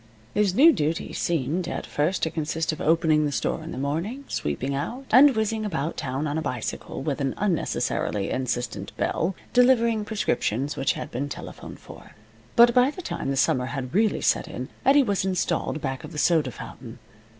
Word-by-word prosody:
His 205 Hz, -3 st, +2 dB
new 315 Hz, +7 st, +7 dB
duties 155 Hz, -, -2 dB
seemed, 165 Hz, +2 st, -1 dB
at -, -, -4 dB
first, 155 Hz, +6 st, -1 dB
to 160 Hz, -, +1 dB
consist 160 Hz, +1 st, -1 dB
of 155 Hz, -, -6 dB
opening 160 Hz, -1 st, +3 dB
the -, -, -3 dB
store 150 Hz, -, -1 dB
in 165 Hz, -, -7 dB
the -, -, -6 dB
morning, 165 Hz, -, -3 dB
sweeping 125 Hz, -, -2 dB
out, 235 Hz, -, -4 dB
and 265 Hz, +2 st, +7 dB
whizzing 220 Hz, 0 st, 0 dB
about 165 Hz, -6 st, -2 dB
town 135 Hz, +3 st, -3 dB
on 150 Hz, +1 st, -1 dB
a -, -, -3 dB
bicycle 125 Hz, -2 st, -4 dB
with 145 Hz, -1 st, -2 dB
an 135 Hz, -2 st, -1 dB
unnecessarily 165 Hz, -, -1 dB
insistent 125 Hz, -2 st, -3 dB
bell, 175 Hz, +3 st, 0 dB, 0.2 s
delivering 235 Hz, -3 st, +4 dB
prescriptions 140 Hz, -, -1 dB
which 135 Hz, -, +1 dB
had -, -, -6 dB
been 140 Hz, +4 st, -3 dB
telephoned -, -, -8 dB
for. -, -, -14 dB, 0.4 s
But 235 Hz, 0 st, +7 dB
by 250 Hz, +2 st, +5 dB
the 355 Hz, +5 st, -8 dB
time 135 Hz, -, -3 dB
the 135 Hz, -, -1 dB
summer 125 Hz, -1 st, +2 dB
had 130 Hz, 0 st, -5 dB
really 215 Hz, +2 st, +2 dB
set -, -, +2 dB
in -, -, -6 dB, 0.2 s
Eddie 280 Hz, +1 st, +6 dB
was 200 Hz, -6 st, 0 dB
installed 175 Hz, -4 st, -1 dB
back 135 Hz, -2 st, -3 dB
of 155 Hz, +2 st, -9 dB
the -, -, -7 dB
soda 160 Hz, 0 st, +3 dB
fountain. -, -, -10 dB
160 Hz, 185 wpm, -25 LUFS, 140-215 Hz, 0.4 s, new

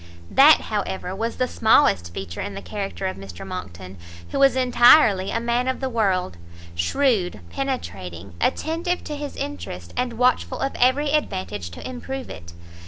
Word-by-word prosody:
That, 295 Hz, +3 st, +7 dB
however, 190 Hz, -3 st, -3 dB
was 230 Hz, +3 st, -3 dB
the 255 Hz, -, 0 dB
smallest 100 Hz, -, +3 dB
feature 85 Hz, -1 st, -6 dB
in 100 Hz, -, -5 dB
the 100 Hz, -, -6 dB
character 85 Hz, +1 st, -5 dB
of 95 Hz, 0 st, -2 dB
Mr 95 Hz, -3 st, -9 dB
Monckton, 95 Hz, -, -8 dB, 0.3 s
who -, -, -2 dB
was 275 Hz, -2 st, +5 dB
entirely 240 Hz, -5 st, +5 dB
a 230 Hz, -, -1 dB
man 235 Hz, +2 st, 0 dB
of 260 Hz, -, -1 dB
the 265 Hz, -, -2 dB
world, 190 Hz, -, 0 dB, 0.4 s
shrewd, 180 Hz, -, +1 dB
penetrating, 90 Hz, +1 st, -5 dB
attentive 340 Hz, +3 st, -1 dB
to 300 Hz, -, -5 dB
his 290 Hz, -1 st, -6 dB
interest, 90 Hz, -2 st, -6 dB
and 250 Hz, -1 st, -1 dB
watchful 250 Hz, +2 st, +1 dB
of 270 Hz, -, -2 dB
every 275 Hz, +4 st, +3 dB
advantage 185 Hz, -, -2 dB
to 85 Hz, -, -8 dB
improve 260 Hz, +1 st, -6 dB
it. 85 Hz, 0 st, -10 dB
200 Hz, 160 wpm, -23 LUFS, -, 0.4 s, That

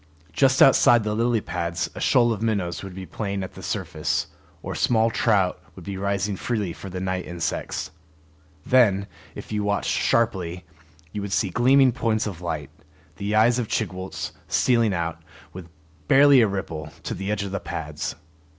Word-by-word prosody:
Just 135 Hz, -1 st, +5 dB
outside 120 Hz, -3 st, +6 dB
the 105 Hz, 0 st, -1 dB
lily 115 Hz, 0 st, +1 dB
pads 85 Hz, -2 st, -3 dB
a -, -, -8 dB
shoal 120 Hz, -2 st, +4 dB
of 105 Hz, -, -6 dB
minnows 100 Hz, -7 st, -1 dB
would 95 Hz, -2 st, -8 dB
be 95 Hz, 0 st, -7 dB
playing 100 Hz, -1 st, -4 dB
at 95 Hz, -, -7 dB
the -, -, -11 dB
surface, -, -, -2 dB, 0.4 s
or -, -, -4 dB
small 115 Hz, -1 st, +2 dB
trout 100 Hz, -6 st, +1 dB
would -, -, -11 dB
be 100 Hz, -1 st, -4 dB
rising 100 Hz, +1 st, -1 dB
freely 105 Hz, -4 st, -2 dB
for 95 Hz, -, -9 dB
the 90 Hz, 0 st, -5 dB
night 95 Hz, 0 st, -3 dB
insects. 85 Hz, -2 st, -3 dB, 0.7 s
Then, 105 Hz, -6 st, +4 dB, 0.3 s
if -, -, -9 dB
you 105 Hz, -1 st, -1 dB
watched 100 Hz, 0 st, 0 dB
sharply, 90 Hz, -7 st, 0 dB, 0.5 s
you 105 Hz, -, -4 dB
would 100 Hz, -1 st, -5 dB
see 95 Hz, -1 st, +1 dB
gleaming 130 Hz, +4 st, +5 dB
points 115 Hz, -3 st, 0 dB
of 95 Hz, -5 st, -6 dB
light, 80 Hz, -5 st, -4 dB, 0.5 s
the 105 Hz, +1 st, -2 dB
eyes 115 Hz, +3 st, +4 dB
of 120 Hz, -, -2 dB
Chigwooltz, 95 Hz, -4 st, -3 dB, 0.2 s
stealing 105 Hz, -, +2 dB
out, 85 Hz, -1 st, -3 dB, 0.3 s
with 90 Hz, -2 st, -9 dB, 0.4 s
barely 140 Hz, -1 st, +7 dB
a 110 Hz, -, +4 dB
ripple, 80 Hz, -6 st, -5 dB
to -, -, -3 dB
the 95 Hz, +2 st, -5 dB
edge 105 Hz, -1 st, -1 dB
of 100 Hz, -, -5 dB
the 100 Hz, -, -2 dB
pads. 75 Hz, -3 st, -5 dB
100 Hz, 175 wpm, -24 LUFS, 90-115 Hz, 0.7 s, barely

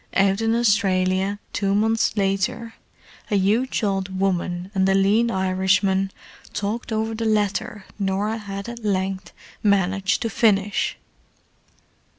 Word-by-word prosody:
Out 195 Hz, +2 st, +3 dB
in 225 Hz, 0 st, +2 dB
Australia, 195 Hz, -3 st, +2 dB, 0.2 s
two 200 Hz, -1 st, 0 dB
months 220 Hz, +1 st, +1 dB
later, 195 Hz, +3 st, -1 dB, 0.6 s
a 210 Hz, -, +1 dB
huge 220 Hz, +6 st, +1 dB
old 195 Hz, -2 st, -1 dB
woman 180 Hz, -1 st, -1 dB
and 190 Hz, -1 st, +2 dB
a 195 Hz, -, +3 dB
lean 205 Hz, +5 st, +3 dB
Irishman 190 Hz, 0 st, +1 dB, 0.4 s
talked 210 Hz, +4 st, -3 dB
over 220 Hz, +1 st, -1 dB
the 225 Hz, +1 st, -4 dB
letter 215 Hz, 0 st, -1 dB
Norah 200 Hz, +3 st, -1 dB
had 200 Hz, -1 st, -6 dB
at 235 Hz, -1 st, -8 dB
length 190 Hz, -2 st, -2 dB, 0.3 s
managed 195 Hz, +1 st, +1 dB
to 230 Hz, -, -1 dB
finish. 205 Hz, -2 st, +1 dB
200 Hz, 125 wpm, -23 LUFS, 190-220 Hz, 0.6 s, Out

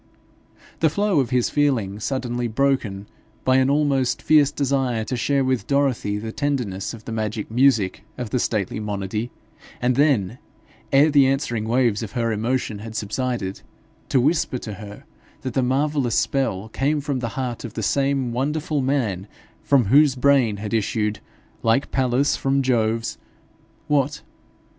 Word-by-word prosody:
The 160 Hz, -, +4 dB
flow 200 Hz, +1 st, +1 dB
of 130 Hz, -, 0 dB
his 125 Hz, -2 st, +1 dB
feeling 120 Hz, -9 st, +1 dB
suddenly 120 Hz, 0 st, -2 dB
broken 115 Hz, -5 st, 0 dB, 0.4 s
by 130 Hz, 0 st, +4 dB
an 130 Hz, 0 st, +3 dB
almost 140 Hz, -3 st, +1 dB
fierce 150 Hz, -2 st, +5 dB
desire 135 Hz, -5 st, 0 dB
to 125 Hz, -, -3 dB
share 140 Hz, +3 st, +1 dB
with 130 Hz, -6 st, -1 dB
Dorothy 135 Hz, -7 st, +1 dB
the 110 Hz, +1 st, -5 dB
tenderness 125 Hz, -8 st, -2 dB
of 110 Hz, -, -15 dB
the -, -, -6 dB
magic 110 Hz, -1 st, -3 dB
music 115 Hz, -6 st, +2 dB
of 120 Hz, -4 st, -5 dB
the 125 Hz, -, +1 dB
stately 105 Hz, -3 st, -1 dB
monody, 105 Hz, +2 st, -3 dB, 0.5 s
and 125 Hz, 0 st, +1 dB
then, 130 Hz, -7 st, +2 dB, 0.5 s
ere 145 Hz, +3 st, +5 dB
the 140 Hz, -2 st, +5 dB
answering 120 Hz, -5 st, -1 dB
waves 120 Hz, -2 st, +2 dB
of 110 Hz, -3 st, -6 dB
her 115 Hz, -1 st, 0 dB
emotion 115 Hz, 0 st, -1 dB
had 110 Hz, +1 st, -8 dB
subsided, 110 Hz, -2 st, -3 dB, 0.5 s
to 135 Hz, -, +3 dB
whisper 150 Hz, 0 st, +1 dB
to 110 Hz, -3 st, -7 dB
her 105 Hz, +1 st, -10 dB, 0.4 s
that 130 Hz, -, -4 dB
the 130 Hz, -, +1 dB
marvellous 135 Hz, -1 st, +1 dB
spell 110 Hz, -7 st, 0 dB
came 145 Hz, +6 st, 0 dB
from 140 Hz, -2 st, -2 dB
the 120 Hz, -2 st, -3 dB
heart 125 Hz, -3 st, -3 dB
of 115 Hz, -2 st, -8 dB
the 110 Hz, -, -3 dB
same 135 Hz, +1 st, +1 dB
wonderful 145 Hz, +4 st, -1 dB
man 115 Hz, -9 st, -1 dB, 0.3 s
from 135 Hz, -5 st, +3 dB
whose 140 Hz, +5 st, +5 dB
brain 130 Hz, -5 st, +3 dB
had 105 Hz, +1 st, -5 dB
issued, 110 Hz, -1 st, 0 dB, 0.4 s
like 115 Hz, +5 st, +1 dB
Pallas 130 Hz, +2 st, +2 dB
from 135 Hz, 0 st, 0 dB
Jove's, 115 Hz, -2 st, 0 dB, 0.7 s
what? 145 Hz, 0 st, 0 dB
125 Hz, 155 wpm, -22 LUFS, 110-140 Hz, 0.7 s, fierce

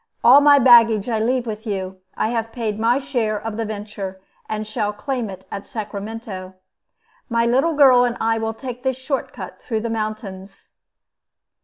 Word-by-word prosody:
All 255 Hz, +5 st, +8 dB
my 290 Hz, 0 st, +7 dB
baggage 230 Hz, -5 st, +6 dB
I 225 Hz, -2 st, 0 dB
leave 245 Hz, +2 st, 0 dB
with 220 Hz, 0 st, -6 dB
you. 190 Hz, -2 st, -4 dB, 0.2 s
I 220 Hz, -, 0 dB
have 225 Hz, -1 st, -2 dB
paid 220 Hz, -3 st, -3 dB
my 230 Hz, +3 st, +3 dB
share 240 Hz, -7 st, -1 dB
of 225 Hz, 0 st, -5 dB
the 225 Hz, 0 st, -2 dB
venture, 205 Hz, -3 st, -6 dB, 0.3 s
and 215 Hz, 0 st, -3 dB
shall 215 Hz, -1 st, -2 dB
claim 235 Hz, +2 st, -3 dB
it 190 Hz, 0 st, -10 dB
at 200 Hz, -, -6 dB
Sacramento. 205 Hz, -3 st, -6 dB, 0.7 s
My 230 Hz, -1 st, +2 dB
little 270 Hz, +7 st, +2 dB
girl 260 Hz, -4 st, +6 dB
and 240 Hz, -1 st, -1 dB
I 225 Hz, 0 st, +1 dB
will 225 Hz, 0 st, -3 dB
take 250 Hz, 0 st, -7 dB
this 260 Hz, -1 st, -1 dB
short 265 Hz, +1 st, -3 dB
cut -, -, -9 dB
through 220 Hz, -2 st, -2 dB
the 230 Hz, 0 st, -3 dB
mountains." 210 Hz, -3 st, -6 dB
225 Hz, 175 wpm, -21 LUFS, 210-245 Hz, 0.7 s, All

